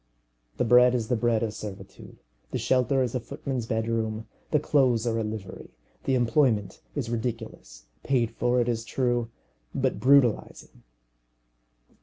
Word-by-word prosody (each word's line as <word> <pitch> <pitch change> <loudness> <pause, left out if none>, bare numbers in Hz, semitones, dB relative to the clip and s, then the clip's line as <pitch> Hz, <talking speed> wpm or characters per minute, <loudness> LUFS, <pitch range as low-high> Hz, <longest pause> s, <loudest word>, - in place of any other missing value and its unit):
The - - +1
bread 125 +1 +6
is 115 -3 -2
the 125 - +2
bread 115 0 +1
of 110 -2 -2
servitude, 105 -3 -9 0.3
the - - -2
shelter 130 +1 +2
is 120 - -3
a 125 - 0
footman's 125 0 -5
bedroom, 110 -1 -1 0.2
the 150 - +3
clothes 130 -6 +2
are 115 -1 0
a - - -1
livery, 105 -3 -7 0.4
the 135 - +2
employment 120 -4 +1
is 125 -6 -3
ridiculous, 110 - -5 0.2
paid 120 -4 +1
for, 125 +1 +1
it 120 - +1
is 115 -2 -1
true, 120 -1 -1 0.5
but - - 0
brutalizing. 125 - +2
120 Hz, 145 wpm, -26 LUFS, 110-125 Hz, 0.5 s, bread